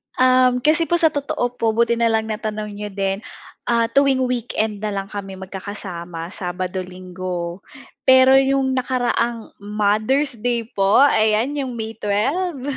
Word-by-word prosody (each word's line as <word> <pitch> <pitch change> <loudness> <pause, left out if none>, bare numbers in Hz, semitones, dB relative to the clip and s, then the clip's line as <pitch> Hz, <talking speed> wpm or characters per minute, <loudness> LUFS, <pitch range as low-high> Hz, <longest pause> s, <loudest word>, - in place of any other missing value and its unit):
Um, 255 -1 +4
kasi 320 +2 +3
po 345 - +2
sa 330 -2 +3
totoo 280 -4 -2
po 225 -1 +1
buti 235 0 +2
na 235 - +3
lang 220 -1 0
natanong 215 0 -4
niyo 205 +1 -6
din, 195 0 -2 0.5
ah, 230 -1 +1
tuwing 275 -1 +3
weekend 230 -4 -2
na 215 - -3
lang 195 0 -4
kami 195 -2 -6
mag-kakasama 185 -3 -7
Sabado, 185 0 -4
Linggo. 180 -1 -6 0.5
Pero 260 0 +7
'yong 270 0 +1
nakaraang 240 -2 -1
Mother's 215 +6 0
Day 235 +1 0
po, 195 +6 +4
ayan 220 -1 +3
'yong 265 -3 -3
May 225 -1 -6
12. 275 - -1
220 Hz, 145 wpm, -21 LUFS, 200-255 Hz, 0.5 s, Pero